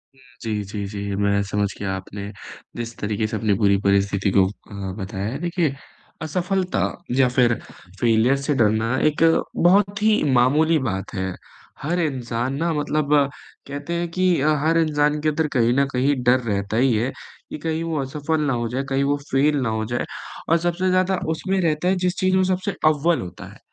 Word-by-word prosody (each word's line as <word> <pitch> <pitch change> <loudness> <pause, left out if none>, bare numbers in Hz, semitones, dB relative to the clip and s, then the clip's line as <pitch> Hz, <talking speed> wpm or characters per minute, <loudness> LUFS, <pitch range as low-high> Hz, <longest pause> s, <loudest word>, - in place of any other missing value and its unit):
हुँ, 135 - -23 0.2
जी, 105 -2 -2
जी, 100 0 -5
जी 100 -1 -4
मैं 100 0 +1
समझ 100 +1 0
गया 95 -1 -2
आपने 100 +2 -7 0.4
जिस 120 0 -6
तरीक़े 105 +1 -1
से 110 0 -3
अपनी 105 -1 +1
पूरी 100 -2 +3
परिस्थिति 100 0 +1
को 95 -1 +5
अ, 100 -1 -7
बताया 95 0 -4
है। 130 +5 -4
देखिए, 170 -4 0 0.5
असफलता 180 +4 -1 0.4
या 135 - +5
फिर 125 -1 +3 0.5
फ़ेलियर 115 +3 +3
से 140 +2 -1
डरना 115 +2 +2
एक 155 +2 +1 0.3
बहुत 200 +3 +3
ही 215 -4 +3
मामूली 150 +7 +4
बात 95 -7 -3
है, 95 -1 -2 0.5
हर 175 +5 -1
इंसान 130 -4 -2
ना 165 +2 0
मतलब 150 0 0 0.5
कहते 145 +4 -5
हैं 170 0 -1
कि 185 -1 +2
अ, 155 +1 +3
हर 165 +1 +3
इंसान 150 -2 +2
के 155 - +2
अंदर 155 +1 0
कहीं 120 0 +3
न 140 - +4
कहीं 135 +3 +2
डर 125 +1 +4
रहता 105 -2 -2
ही 130 0 +3
है, 120 +5 0 0.4
कि - - -5
कहीं 160 +1 -2
वो 165 -3 -2
असफल 150 +3 -2
ना 140 -4 +1
हो 115 - -1
जाए, 130 +3 -2
कहीं 135 0 +1
वो 145 +1 +1
फेल 145 +3 +3
ना 125 - 0
हो 110 0 -1
जाए 120 +2 -2 0.4
और 165 - +5
सबसे 180 +2 0
ज़्यादा 185 0 +2
उसमें 190 +4 -1
रहता 160 +1 0
है 190 - +3
जिस 180 - +1
चीज़ 185 0 +2
में 190 - +4
सबसे 190 +2 -3
अव्वल 155 +2 +3
होता 90 -2 -8
है, - - -18
135 Hz, 190 wpm, -22 LUFS, 110-160 Hz, 0.5 s, को